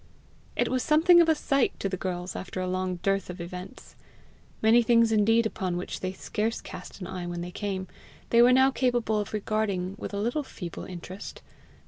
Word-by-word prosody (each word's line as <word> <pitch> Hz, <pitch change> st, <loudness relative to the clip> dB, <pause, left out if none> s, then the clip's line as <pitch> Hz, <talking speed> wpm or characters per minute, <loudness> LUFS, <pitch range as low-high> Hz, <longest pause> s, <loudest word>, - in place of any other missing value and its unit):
It -, -, +1 dB
was 255 Hz, 0 st, 0 dB
something 330 Hz, +5 st, +6 dB
of 330 Hz, -, +3 dB
a 320 Hz, -, +5 dB
sight 275 Hz, -3 st, +1 dB
to -, -, -1 dB
the 190 Hz, -, -2 dB
girls 180 Hz, -1 st, -4 dB
after 185 Hz, 0 st, -5 dB
a 185 Hz, -, -1 dB
long 185 Hz, 0 st, -1 dB
dearth 195 Hz, -1 st, 0 dB
of 180 Hz, 0 st, -7 dB
events. 180 Hz, +2 st, -8 dB, 0.6 s
Many 225 Hz, +2 st, +5 dB
things 230 Hz, -1 st, +4 dB
indeed 225 Hz, +2 st, +4 dB
upon 185 Hz, -5 st, -2 dB
which 180 Hz, -, -5 dB
they 185 Hz, -, -3 dB
scarce 220 Hz, +4 st, -2 dB
cast -, -, -10 dB
an -, -, -4 dB
eye 180 Hz, -1 st, -5 dB
when 175 Hz, 0 st, -4 dB
they 175 Hz, +1 st, -6 dB
came, 190 Hz, -1 st, -3 dB, 0.4 s
they 235 Hz, -, +6 dB
were 245 Hz, +1 st, +7 dB
now 260 Hz, +1 st, +5 dB
capable 240 Hz, -5 st, +1 dB
of 205 Hz, -, -4 dB
regarding 205 Hz, -3 st, -1 dB
with -, -, -5 dB
a 200 Hz, -, -4 dB
little 240 Hz, +8 st, 0 dB
feeble 180 Hz, -, -7 dB
interest. 185 Hz, +2 st, -8 dB
205 Hz, 195 wpm, -27 LUFS, 185-235 Hz, 0.6 s, were